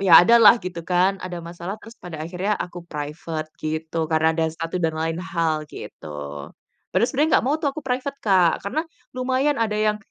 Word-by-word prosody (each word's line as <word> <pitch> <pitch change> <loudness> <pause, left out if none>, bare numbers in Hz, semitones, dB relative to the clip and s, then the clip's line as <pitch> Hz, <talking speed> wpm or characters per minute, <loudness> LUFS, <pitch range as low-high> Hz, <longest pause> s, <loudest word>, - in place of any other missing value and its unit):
ya 190 -3 +3
ada 235 +7 +6
lah, 215 - +10
gitu 180 -2 -5
kan, 185 +2 +2
ada 180 -1 -5
masalah, 175 +4 -6
terus 230 - -12
pada 175 -2 -7
akhirnya 180 +5 -2
aku 175 0 -5
private, 155 0 -5
gitu. 155 +1 -4
Karena 160 0 +3
ada 165 - +1
satu 165 +2 -4
dan 160 -1 +2
lain 160 +1 -1
hal, 165 -4 -1
gitu. 75 -1 -9 0.8
Padahal 235 - +3
sebenarnya 295 +3 +1
nggak - - -5
mau 285 - +3
tuh 290 - +1
aku 310 - -6
private 265 +2 -2
Kak, 185 -5 +4
karena 200 +10 -1 0.4
lumayan 260 +3 +1
ada 215 -2 +1
yang 215 0 +2
180 Hz, 190 wpm, -23 LUFS, 165-225 Hz, 0.8 s, lah